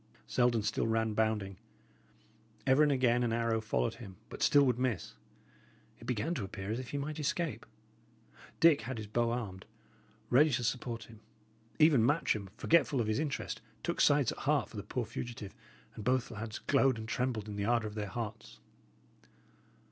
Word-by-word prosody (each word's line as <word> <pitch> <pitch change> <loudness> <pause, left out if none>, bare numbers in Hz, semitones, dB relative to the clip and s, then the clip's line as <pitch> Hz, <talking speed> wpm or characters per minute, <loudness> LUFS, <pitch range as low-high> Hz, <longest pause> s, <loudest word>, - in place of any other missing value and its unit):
Selden 120 -3 +2
still 110 - 0
ran, 110 -1 +1
bounding; 105 -3 0 1.1
ever 135 +2 +5
and 150 -1 +5
again 125 -3 +3
an 120 -2 +1
arrow 115 -1 +1
followed 110 +1 0
him, 110 -6 -10
but - - -9
still 145 -1 +5
would 125 -2 +1
miss. 125 -8 -1 0.9
It 115 - -12
began 125 +6 -1
to 130 -11 -3
appear 95 +1 -5
as 115 - -2
if 130 -2 -7
he 145 - -3
might 150 +2 -4
escape. 160 +2 -2 0.9
Dick 165 -7 +6
had 120 +2 -5
his 110 - -5
bow 115 +3 0
armed, 105 -6 -4 0.6
ready 150 +5 +6
to 120 - 0
support 120 -1 -2
him; 110 -1 -14 0.6
even 150 -7 +5
Matcham, 125 - +1
forgetful 150 -5 +3
of 115 - +1
his 110 +3 0
interest, 150 -3 -3 0.2
took - - -1
sides - - +4
at - - -8
heart - - +1
for - - -10
the - - -3
poor - - -3
fugitive; 115 -5 -6 0.4
and 110 - -8
both 125 +2 +1
lads 110 0 -5
glowed 135 -3 +2
and 110 0 -6
trembled 115 -3 -1
in 105 - -6
the 100 0 -2
ardour 115 -1 +2
of 105 - -7
their 105 -1 -3
hearts. 105 - -6
115 Hz, 180 wpm, -32 LUFS, 110-130 Hz, 1.1 s, Dick